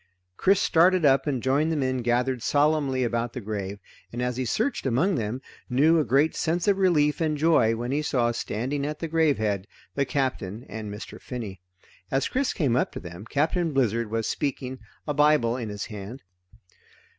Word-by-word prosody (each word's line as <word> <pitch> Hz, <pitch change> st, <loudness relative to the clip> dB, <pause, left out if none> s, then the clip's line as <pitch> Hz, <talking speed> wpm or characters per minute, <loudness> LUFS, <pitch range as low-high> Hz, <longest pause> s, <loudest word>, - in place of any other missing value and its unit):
Chris 195 Hz, -, +3 dB
started 180 Hz, -2 st, +4 dB
up 135 Hz, +1 st, +4 dB
and 130 Hz, -5 st, -1 dB
joined 145 Hz, +5 st, +2 dB
the -, -, 0 dB
men 130 Hz, -3 st, 0 dB
gathered 125 Hz, +1 st, 0 dB
solemnly 145 Hz, -2 st, +2 dB
about 120 Hz, 0 st, -1 dB
the -, -, -4 dB
grave, 100 Hz, -2 st, -4 dB, 0.3 s
and 120 Hz, -, -6 dB
as 125 Hz, 0 st, -1 dB
he 130 Hz, +1 st, -2 dB
searched 220 Hz, -, -1 dB
among 145 Hz, +11 st, +2 dB
them, 120 Hz, -1 st, -3 dB, 0.3 s
knew 155 Hz, +6 st, +4 dB
a -, -, +3 dB
great 145 Hz, +3 st, +2 dB
sense 170 Hz, +2 st, -1 dB
of 200 Hz, -1 st, +3 dB
relief 155 Hz, -5 st, +3 dB
and 155 Hz, -2 st, +1 dB
joy 145 Hz, -8 st, +3 dB
when 120 Hz, +2 st, -4 dB
he 145 Hz, +2 st, +1 dB
saw, 120 Hz, -5 st, +1 dB
standing 125 Hz, +5 st, -3 dB
at 150 Hz, +1 st, -3 dB
the 165 Hz, -, -4 dB
grave 160 Hz, -2 st, +2 dB
head, 105 Hz, -2 st, -1 dB, 0.3 s
the 140 Hz, -, +1 dB
Captain 125 Hz, -5 st, -2 dB
and 105 Hz, 0 st, -6 dB
Mr. 105 Hz, +1 st, -9 dB
Finney. 110 Hz, -8 st, -6 dB, 0.5 s
As 135 Hz, 0 st, +1 dB
Chris 265 Hz, +1 st, 0 dB
came 140 Hz, -, 0 dB
up 125 Hz, -, +1 dB
to -, -, -5 dB
them, 85 Hz, +3 st, -9 dB
Captain 160 Hz, +3 st, 0 dB
Blizzard 115 Hz, -4 st, +1 dB
was 115 Hz, 0 st, -1 dB
speaking, 130 Hz, -2 st, -3 dB, 0.3 s
a 150 Hz, -, 0 dB
Bible 150 Hz, -5 st, +3 dB
in 120 Hz, -4 st, -4 dB
his 105 Hz, 0 st, -5 dB
hand. 105 Hz, +4 st, -8 dB
130 Hz, 190 wpm, -26 LUFS, 115-150 Hz, 0.5 s, started